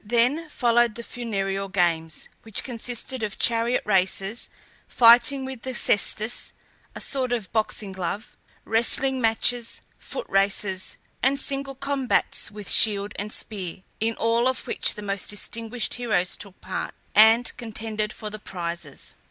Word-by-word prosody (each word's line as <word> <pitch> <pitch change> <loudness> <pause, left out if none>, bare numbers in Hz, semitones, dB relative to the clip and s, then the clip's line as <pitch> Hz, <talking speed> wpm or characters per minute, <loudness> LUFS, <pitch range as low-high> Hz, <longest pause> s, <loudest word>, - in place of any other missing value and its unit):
Then 245 +9 +1
followed 240 -4 +2
the 235 - -7
funereal 195 -5 -3
games, 165 -4 0
which 220 -3 -3
consisted 245 +1 -3
of 215 -1 -3
chariot 235 +1 +2
races, 195 +2 0 0.4
fighting 245 +3 +6
with 260 -3 -7
the 260 -1 -5
cestus 220 0 +1 0.4
(a - - -6
sort 260 -3 -1
of 230 -6 -2
boxing 215 -2 -1
glove), 190 +3 -5 0.3
wrestling 255 +4 +2
matches, 230 +1 +1 0.2
foot - - -5
races, 195 -1 0 0.2
and 275 +2 +2
single 275 -1 -1
combats 270 -1 0
with 205 -2 -9
shield 205 -2 +5
and 210 +1 -4
spear, 190 -5 -5 0.2
in 225 +1 0
all 230 +2 +2
of 260 - -1
which - - +2
the 210 - -7
most 200 -1 -2
distinguished 230 +3 -3
heroes 215 -7 0
took 200 -2 -7
part, - - -4 0.2
and 225 +3 +6
contended 220 -2 -3
for 215 -1 -7
the 215 - -7
prizes. 170 -6 -6
225 Hz, 140 wpm, -25 LUFS, 200-245 Hz, 0.4 s, fighting